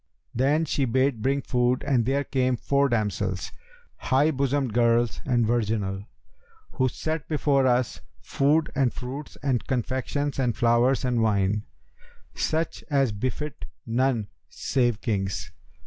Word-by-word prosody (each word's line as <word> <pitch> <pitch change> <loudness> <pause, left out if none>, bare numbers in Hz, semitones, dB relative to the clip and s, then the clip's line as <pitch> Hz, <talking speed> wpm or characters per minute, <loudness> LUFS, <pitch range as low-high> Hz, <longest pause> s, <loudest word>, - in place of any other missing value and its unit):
Then 145 +6 +2
she 140 -2 0
bade 130 -1 +1
bring 135 +3 0
food 125 0 +1
and 125 -4 +1
there 140 +2 +1
came 130 -3 0
four 140 +3 +1
damsels, 105 -4 -1 0.5
high 140 +4 +2
bosomed 135 -3 0
girls 120 0 +2
and 120 -4 +2
virginal, 105 -4 -1 0.7
who 130 -2 +1
set 155 +4 -4
before 140 -3 +2
us 125 -2 +1 0.2
food 150 +3 +1
and 135 -4 +2
fruits 135 +4 -7
and 130 -4 0
confections 130 +3 -2
and 125 -3 0
flowers 120 +3 +3
and 125 -2 +1
wine, 105 -1 +1 0.7
such 160 +1 -1
as 135 -5 +2
befit 130 +8 -4 0.2
none 120 -2 +1 0.2
save 120 -4 0
kings. 95 -4 -2
130 Hz, 130 wpm, -26 LUFS, 115-140 Hz, 0.7 s, flowers